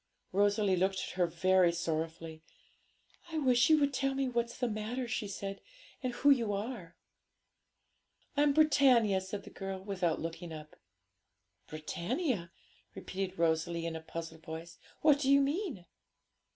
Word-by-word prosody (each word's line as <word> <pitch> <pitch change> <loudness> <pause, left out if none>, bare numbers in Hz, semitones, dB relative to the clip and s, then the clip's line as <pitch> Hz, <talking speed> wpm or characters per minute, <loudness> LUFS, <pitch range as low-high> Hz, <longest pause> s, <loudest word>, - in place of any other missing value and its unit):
Rosalie 205 0 +3
looked 190 +2 +1
at - - -3
her 180 -1 +1
very 175 +2 +3
sorrowfully; 165 -1 -3 0.9
'I 320 - -2
wish 255 -3 +4
you 310 -1 +6
would 285 -1 +2
tell 270 0 0
me 270 0 0
what's 235 -1 -2
the 250 - 0
matter,' 225 +3 -3
she 220 -2 -2
said, 195 0 -5 0.4
'and 255 -2 -1
who 280 +4 +4
you 230 -6 +2
are.' 200 -4 -5 1.4
'I'm 290 0 +4
Britannia,' 260 -10 +4
said 195 +1 -6
the - - -12
girl, 195 0 -5
without 180 -5 -1
looking 165 +1 -6
up. 155 -1 -9 0.9
'Britannia!' 170 - -2 0.4
repeated 190 0 -4
Rosalie, 165 0 +1
in 165 -1 -3
a 160 - -5
puzzled 160 0 -7
voice; 165 +1 -8 0.2
'what 295 -2 +5
do 270 -2 0
you 280 0 +7
mean?' 280 - -1
195 Hz, 145 wpm, -32 LUFS, 170-255 Hz, 1.4 s, you